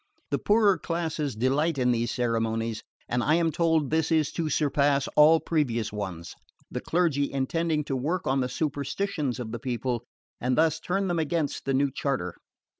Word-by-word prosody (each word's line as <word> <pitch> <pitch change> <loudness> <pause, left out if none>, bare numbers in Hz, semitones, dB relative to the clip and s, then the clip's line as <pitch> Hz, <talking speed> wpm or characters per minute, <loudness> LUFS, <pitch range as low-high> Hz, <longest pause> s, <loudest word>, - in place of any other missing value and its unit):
The - - +1
poorer 205 -2 +3
classes 160 -5 -2
delight 140 +7 +1
in 125 -1 +2
these 120 0 0
ceremonies, 115 -2 -1 0.3
and 120 0 0
I 155 - +3
am 165 -1 +2
told 160 -4 +1
this 160 0 +1
is 155 -2 +2
to 165 -2 -2
surpass 140 -2 +2
all 155 +2 +6
previous 120 -11 -1
ones, 95 -5 -5 0.4
the - - -3
clergy 160 -5 +1
intending 150 +3 0
to 135 - -3
work 160 +8 -1
on 135 +1 +1
the 125 -1 0
superstitions 150 0 -2
of 115 -3 -5
the 120 - -4
people 120 0 -2 0.4
and 125 +1 0
thus 160 0 +3
turn 195 +3 -1
them 175 -2 0
against 160 -1 -1
the 135 -1 +1
new 140 +1 +2
charter. 130 - -2
145 Hz, 175 wpm, -27 LUFS, 125-160 Hz, 0.4 s, all